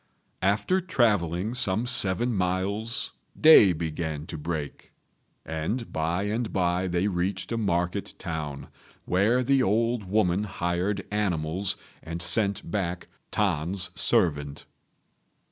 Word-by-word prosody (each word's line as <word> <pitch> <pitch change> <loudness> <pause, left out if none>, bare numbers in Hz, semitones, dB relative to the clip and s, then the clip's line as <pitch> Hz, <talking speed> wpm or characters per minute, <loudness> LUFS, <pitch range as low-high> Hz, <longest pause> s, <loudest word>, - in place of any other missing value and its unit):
After 105 - +1
travelling 105 - +1
some 110 -2 0
seven 120 +1 +1
miles 100 +6 -1 0.3
day 155 - +8
began 80 -2 -3
to 85 - -7
break; 75 -2 -5 0.5
and 80 +10 -3
by 85 +4 -1
and 110 +2 -2
by 90 0 0
they 90 +1 0
reached 95 +1 -2
a 115 - -1
market 95 -2 -1
town, 80 -5 -5 0.4
where 110 +8 +2
the 135 +1 +3
old 115 0 +1
woman 95 -1 +1
hired 95 +1 -2
animals 95 -2 0 0.3
and 85 +1 -6
sent 100 0 +2
back 90 -3 -3 0.2
T'an's 90 -1 -1
servant. 75 -5 +1
95 Hz, 110 wpm, -26 LUFS, 85-105 Hz, 0.5 s, day